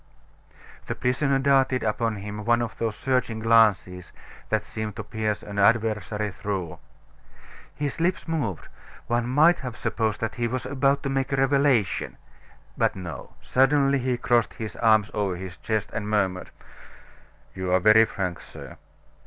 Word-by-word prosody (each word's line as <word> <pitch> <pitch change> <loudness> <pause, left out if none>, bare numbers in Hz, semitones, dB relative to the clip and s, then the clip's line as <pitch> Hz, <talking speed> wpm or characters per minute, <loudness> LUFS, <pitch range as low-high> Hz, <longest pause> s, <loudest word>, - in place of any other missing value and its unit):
The - - -3
prisoner 135 +2 +1
darted 135 -2 +2
upon 110 +1 -1
him 105 +1 -6
one 120 +2 +2
of 115 - -6
those 110 -2 -1
searching 125 -4 -1
glances 105 -5 +2 0.4
that 110 -1 0
seem 110 -1 -5
to 110 - -6
pierce 110 0 -3
an 100 0 -5
adversary 105 -1 +1
through. 95 -3 -5 1.0
His 145 0 -3
lips 175 +2 0
moved; 130 - -3 0.4
one 120 0 0
might 155 +6 +4
have 125 -4 -6
supposed 110 -2 -1
that 115 -1 -2
he 120 -1 -1
was 125 +2 -3
about 140 +1 +1
to 140 - -2
make 135 0 -1
a - - +2
revelation. 135 -6 +1 0.6
But - - +1
no; 85 -8 -8
suddenly 135 +1 +3
he 125 -1 -1
crossed 120 -1 +1
his 110 -3 -6
arms 110 -2 +3
over 100 -3 -1
his 90 0 -8
chest, 110 +1 -2
and 105 -1 -4
murmured: 95 -3 0 1.0
"You 95 -1 -3
are 90 - +4
very 110 +4 +6
frank, 90 -5 -4
sir. - - -11
115 Hz, 155 wpm, -25 LUFS, 105-130 Hz, 1.0 s, very